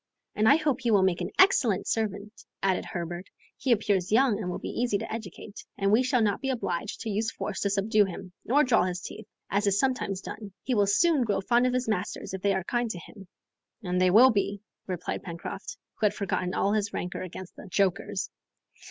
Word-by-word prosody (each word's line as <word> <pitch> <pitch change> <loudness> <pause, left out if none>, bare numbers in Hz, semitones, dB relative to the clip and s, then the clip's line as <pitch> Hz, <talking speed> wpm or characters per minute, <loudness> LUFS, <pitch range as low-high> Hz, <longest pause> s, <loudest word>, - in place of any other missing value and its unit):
"And 215 +1 +3
I - - +8
hope 300 -5 0
he 240 - 0
will 205 -4 +5
make 185 -2 +1
an - - -2
excellent 245 - +4
servant," 210 -1 -3 0.2
added 190 -2 +1
Herbert. 175 +1 -5 0.3
"He 260 - -1
appears 200 -5 +1
young, 230 -2 +4
and 180 - -3
will 180 - -3
be - - -4
easy 240 -5 +1
to 200 - -6
educate, 215 -1 -8
and 195 0 +1
we 220 +4 +5
shall 255 -2 +2
not 205 -2 0
be 270 - -2
obliged 185 -9 -3
to 220 - -3
use 215 +2 0
force 210 - -4
to 200 - 0
subdue 205 +1 +3
him, 185 -1 -8
nor 285 +5 +3
draw 235 -8 +3
his 180 -1 -2
teeth, - - -9 0.2
as 205 +1 +1
is 200 0 +3
sometimes 205 -7 0
done. 200 -2 -8
He 260 - -1
will 205 -3 +3
soon 300 - +3
grow 210 -4 0
fond 240 +5 +3
of 250 - 0
his 255 -1 -1
masters 195 -3 -3
if 190 - -4
they 200 0 +2
are 190 - -1
kind 240 +4 -1
to 185 - -4
him." 195 +3 -12 0.6
"And 180 -1 0
they 185 - +5
will 240 +8 +7
be," 200 -1 -1 0.2
replied 180 -2 -3
Pencroft, 170 +2 -7 0.2
who 215 - +4
had 205 - -3
forgotten 185 -2 -2
all 200 - +1
his 210 -1 -1
rancor 180 - -4
against 185 0 -8
"the - - -11
jokers." 195 +1 0
205 Hz, 220 wpm, -28 LUFS, 190-230 Hz, 0.6 s, I